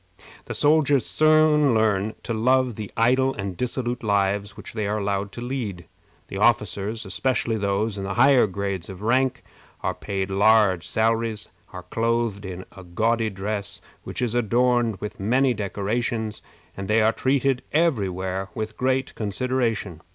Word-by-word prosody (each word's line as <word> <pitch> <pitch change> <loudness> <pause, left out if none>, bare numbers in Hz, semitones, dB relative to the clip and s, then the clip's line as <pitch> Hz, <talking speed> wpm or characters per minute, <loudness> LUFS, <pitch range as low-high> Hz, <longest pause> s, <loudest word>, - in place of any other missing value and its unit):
The - - -5
soldiers 145 -4 +3
soon 155 -3 +4
learn 110 -1 +1
to 115 - -3
love 125 +2 +2
the 105 -2 -7
idle 130 +3 +3
and 95 -3 -4
dissolute 125 +2 -3
lives 100 -1 0
which - - -9
they 110 -2 -2
are 105 +1 -1
allowed 100 -1 -2
to 120 - -7
lead. 115 -9 -4 0.4
The 95 - -6
officers, 105 -1 +1
especially 110 +6 0
those 100 +1 -1
in - - -4
the 95 0 -3
higher 130 -1 +5
grades 100 -2 -4
of 95 +1 -9
rank, 125 +2 +1 0.4
are - - -1
paid 95 -1 -4
large 100 -3 +4
salaries, 110 -1 0 0.2
are - - -8
clothed 115 -3 -1
in 95 0 -7
a 95 - -10
gaudy 110 +6 0
dress 100 0 -4 0.2
which - - -4
is 120 -2 -1
adorned 120 0 +2
with 105 +2 -7
many 125 +6 +2
decorations, 110 +2 -2 0.3
and 95 0 -6
they 110 +1 +3
are 110 +1 +3
treated 135 0 +1
every 150 - +2
where 95 +1 -4
with 110 -1 -4
great 130 +1 0
consideration. 110 -5 -2
110 Hz, 155 wpm, -24 LUFS, 100-125 Hz, 0.4 s, higher